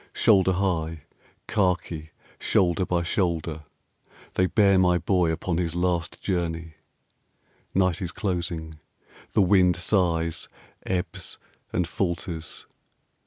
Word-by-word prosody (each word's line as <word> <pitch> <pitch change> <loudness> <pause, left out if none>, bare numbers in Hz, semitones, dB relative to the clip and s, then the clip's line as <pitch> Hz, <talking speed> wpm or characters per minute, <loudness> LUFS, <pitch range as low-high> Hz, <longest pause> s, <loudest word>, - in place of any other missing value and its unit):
Shoulder 95 -3 +4
high, 85 -5 -1 0.4
khaki 90 -5 0 0.3
shoulder 90 0 +2
by 85 -1 +1
shoulder, 85 -4 -1 0.7
They 95 - +2
bear 100 -1 +4
my 90 -1 +4
Boy 90 -1 +2
upon 85 +1 -1
his 85 -2 -1
last 85 -2 0
journey. 85 -3 -2 1.0
Night 95 0 +2
is 90 -2 -3
closing. 85 -6 -3 0.5
The 105 - +5
wind 90 -2 +4
sighs, 85 -3 +1 0.4
ebbs, 90 -2 -3 0.3
and 90 -2 0
falters.... 85 -1 -3
90 Hz, 105 wpm, -26 LUFS, 80-95 Hz, 1.0 s, The